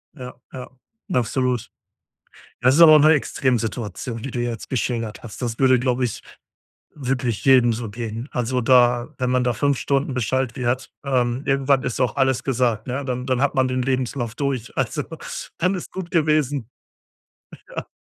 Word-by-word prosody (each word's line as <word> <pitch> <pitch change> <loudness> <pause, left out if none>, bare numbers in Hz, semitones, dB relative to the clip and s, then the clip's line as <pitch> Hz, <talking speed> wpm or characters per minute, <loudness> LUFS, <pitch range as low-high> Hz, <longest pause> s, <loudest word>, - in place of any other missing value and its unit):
Ja, 125 0 -8 0.2
ja, 125 -1 -8 0.4
absolut. 125 -3 0 0.9
Das 130 +2 +4
ist 170 - +3
aber 155 -2 +10
auch - - +7
'ne 155 +2 +6
Extremsituation, 120 - -1
die 135 - -5
du 120 - -2
jetzt 120 -2 -4
geschildert 115 -3 -2
hast. 115 -4 -9
Das 115 -2 -3
würde, 130 -1 +5
glaube 125 0 0
ich, 115 - -4 0.7
wirklich 125 -5 -2
jedem 125 -3 +5
so 115 -1 -5
gehen. 115 +2 -5
Also, 125 +1 -1
da 120 0 +3
wenn 125 -1 0
man 125 0 +2
da 125 - +1
5 140 +3 +1
Stunden 140 +1 0
beschallt 130 +1 -1
wird. 130 0 -1 0.2
Ähm, 125 0 0
irgendwann 135 -1 +2
ist 125 - -3
auch 125 -4 +1
alles 130 -2 +1
gesagt, 120 -4 0
ne? 135 +2 -3
Dann 125 -1 -3
dann 130 -1 +1
hat 145 - +2
man 130 -1 +2
den 130 0 -1
Lebenslauf 130 -2 -2
durch. 135 -5 -3
Also, - - -1 0.6
dann 185 +3 +2
ist 180 - -4
es - - -13
gut 185 -2 -6
gewesen. 150 - +1 1.0
Ja. - - -6
125 Hz, 175 wpm, -22 LUFS, 120-135 Hz, 1.0 s, aber